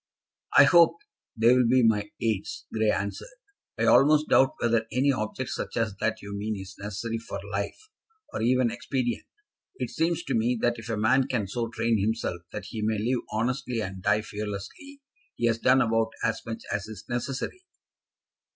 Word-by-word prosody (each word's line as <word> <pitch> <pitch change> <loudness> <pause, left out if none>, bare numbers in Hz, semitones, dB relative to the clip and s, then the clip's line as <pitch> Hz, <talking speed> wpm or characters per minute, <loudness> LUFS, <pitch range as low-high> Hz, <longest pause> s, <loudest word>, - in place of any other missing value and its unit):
"I - - +11
hope 170 -2 +6 0.4
they 115 +3 +5
will 125 -2 +4
be 125 +1 +4
my 105 -2 +2
aids," 110 -4 -2
Grey 110 -1 +2
answered. 105 - -3 0.4
"I - - 0
almost 150 +2 +5
doubt 135 - +4
whether 115 -1 +1
any 130 +5 +3
object 130 +1 -3
such - - -4
as 110 -4 0
that 110 0 -1
you 100 0 -6
mean 105 0 -3
is 95 +1 -9
necessary 105 +3 -4
for 105 -3 -6
life, 100 0 -2 0.6
or - - -3
even 125 0 +3
expedient. 120 0 -2 0.5
It - - -4
seems 165 +1 0
to 135 - -3
me 120 +2 +1
that 120 -1 +1
if 115 +1 -9
a 115 - -1
man 130 +5 +3
can 110 -6 -1
so 115 +4 -2
train 115 -1 0
himself 105 -4 -1
that - - -6
he 110 - -5
may 110 0 0
live 120 +4 0
honestly 120 +2 -1
and 95 -3 -5
die 105 +2 +2
fearlessly, 105 - -7 0.3
he - - -1
has 115 -1 +2
done 130 +2 +4
about 115 0 +1
as 110 -1 0
much 115 0 -5
as 100 +1 -2
is 110 -1 -9
necessary." 130 - -3
115 Hz, 180 wpm, -27 LUFS, 105-125 Hz, 0.6 s, I